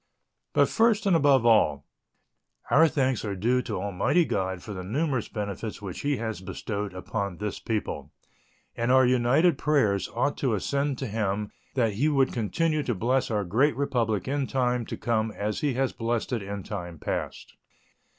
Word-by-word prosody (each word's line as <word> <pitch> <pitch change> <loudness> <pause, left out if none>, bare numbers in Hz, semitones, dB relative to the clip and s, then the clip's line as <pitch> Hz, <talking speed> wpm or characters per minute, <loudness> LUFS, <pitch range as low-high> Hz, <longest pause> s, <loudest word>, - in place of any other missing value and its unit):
But - - +4
first 225 -2 +2
and 195 -3 +4
above 140 -6 +4
all, 105 -11 +4 0.9
our 160 +3 +7
thanks 130 -5 0
are 100 -3 -3
due 120 +7 +1
to 110 -6 -4
Almighty 100 - +1
God 95 -6 -2
for 105 - -6
the 95 -1 -6
numerous 130 - -1
benefits 105 0 -5
which 95 -3 -6
He 145 -1 0
has 110 -3 -4
bestowed 100 0 -5
upon 100 0 -3
this 105 -1 -4
people, 110 -2 -3 0.6
and 115 +1 0
our 130 0 +6
united 130 +6 +3
prayers 110 -11 +2
ought 140 +4 0
to 125 -5 +1
ascend 140 +6 -1
to 135 - -4
Him 105 -1 -2 0.2
that 115 -5 +2
He 140 +10 +1
would 135 -3 +2
continue 155 +8 0
to 120 -5 -2
bless 125 +7 +1
our 105 -3 0
great 125 - +2
Republic 115 -8 0
in 140 0 -1
time 125 -3 0
to - - -5
come 115 -1 0
as 105 +1 -2
He 145 -4 0
has 135 0 0
blessed 115 +2 -2
it 115 - -1
in 100 0 -5
time 90 -5 -6
past. - - -4
115 Hz, 175 wpm, -27 LUFS, 100-135 Hz, 0.9 s, our